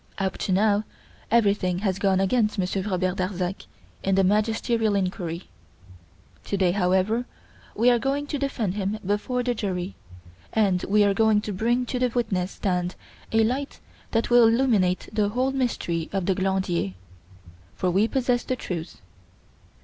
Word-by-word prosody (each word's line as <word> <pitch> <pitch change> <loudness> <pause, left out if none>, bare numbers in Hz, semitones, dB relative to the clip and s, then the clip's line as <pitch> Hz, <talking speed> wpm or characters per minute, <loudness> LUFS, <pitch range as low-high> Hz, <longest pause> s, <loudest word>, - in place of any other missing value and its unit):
Up 190 -1 -1
to - - -2
now 205 +2 +3 0.5
everything 200 -5 +2
has 190 -1 0
gone 195 -2 +2
against 210 +2 +1
Monsieur 190 +1 -1
Robert 185 -1 -1
Darzac 185 0 -3 0.3
in 195 0 +1
the 195 - +4
magisterial 220 +2 +1
inquiry. 180 -3 -2 1.0
To 200 - -2
day, 185 -2 +3
however, 190 +5 +1 0.5
we 240 +3 +4
are 240 - +3
going 275 +3 -1
to 290 0 -3
defend 240 -8 -1
him 200 +1 -2
before 210 +6 -1
the 245 0 0
jury, 190 -4 -3 0.6
and 195 -5 +2
we 210 +1 +5
are 200 -1 +3
going 220 0 +3
to 210 - -4
bring 240 +6 +1
to 250 +1 -3
the 250 - +3
witness 195 -6 -1
stand 180 -2 -1 0.4
a 225 0 +4
light 265 +5 -2 0.3
that 225 +1 0
will 240 -1 +7
illumine 225 -7 +3 0.2
the 210 -1 +1
whole 255 +5 0
mystery 225 -11 -2
of 195 -2 -1
the 190 - +2
Glandier. 185 - -1 0.8
For 185 - 0
we 200 +5 +3
possess 245 -1 +1
the 255 - -2
truth. 170 -8 -6
205 Hz, 155 wpm, -25 LUFS, 185-230 Hz, 1.0 s, will